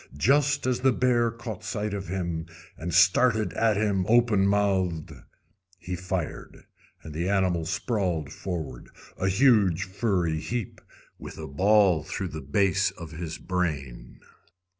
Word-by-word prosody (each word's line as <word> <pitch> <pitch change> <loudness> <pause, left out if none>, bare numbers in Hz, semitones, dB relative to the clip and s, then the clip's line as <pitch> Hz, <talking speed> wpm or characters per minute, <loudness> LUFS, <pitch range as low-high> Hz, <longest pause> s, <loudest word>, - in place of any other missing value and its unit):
Just 140 - +2
as 125 -1 +1
the 130 +1 +3
bear 120 -1 +2
caught 115 -4 -7
sight 105 +1 -3
of 100 -1 -4
him, 85 -3 -3 0.3
and 85 +2 -5
started 105 +6 +4
at 110 -3 +2
him 100 -3 +1
open 115 -4 +4
mouthed, 95 -5 0 0.7
he 90 +1 -5
fired, 90 -2 -5 0.4
and 75 0 -9
the 85 +4 -2
animal 90 -5 +1
sprawled 90 - -2
forward, 80 -10 -6 0.3
a 95 - 0
huge 95 -5 +4
furry 95 -5 -1
heap, 115 +4 -5 0.4
with - - -9
a - - -6
ball 95 +3 +3
through - - -4
the - - -6
base 100 +7 +2
of 85 -2 -10
his 80 -1 -6
brain. 80 -9 -4
95 Hz, 140 wpm, -26 LUFS, 85-110 Hz, 0.7 s, started